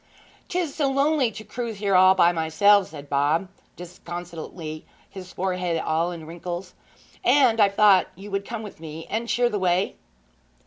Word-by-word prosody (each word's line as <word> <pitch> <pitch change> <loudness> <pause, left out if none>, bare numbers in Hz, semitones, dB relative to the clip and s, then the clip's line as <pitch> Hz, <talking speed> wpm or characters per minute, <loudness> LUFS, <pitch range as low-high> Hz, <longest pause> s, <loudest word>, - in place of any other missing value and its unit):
''Tis 350 -5 -2
so 285 -3 0
lonely 275 -1 +2
to 215 0 -10
cruise 235 -2 -5
for 205 - -7
her 195 -1 +2
all 185 +1 +6
by 175 -2 +5
myself!' 180 +5 +3
said 145 -2 -11
Bob 145 +6 +1 0.3
disconsolately, 170 -2 -8 0.2
his 185 -2 -10
forehead 180 -2 -2
all 165 +2 0
in 165 -2 -8
wrinkles, 175 +2 -7 0.5
'and 250 -3 +4
I've 200 -1 +3
thought 200 -3 +5
you 200 +3 -11
would 195 0 -1
come 225 +1 -6
with 210 - -10
me 160 0 -8
and 230 +2 -2
cheer 245 0 +2
the 210 -4 -2
way?' 185 +1 0
185 Hz, 170 wpm, -24 LUFS, 170-215 Hz, 0.5 s, all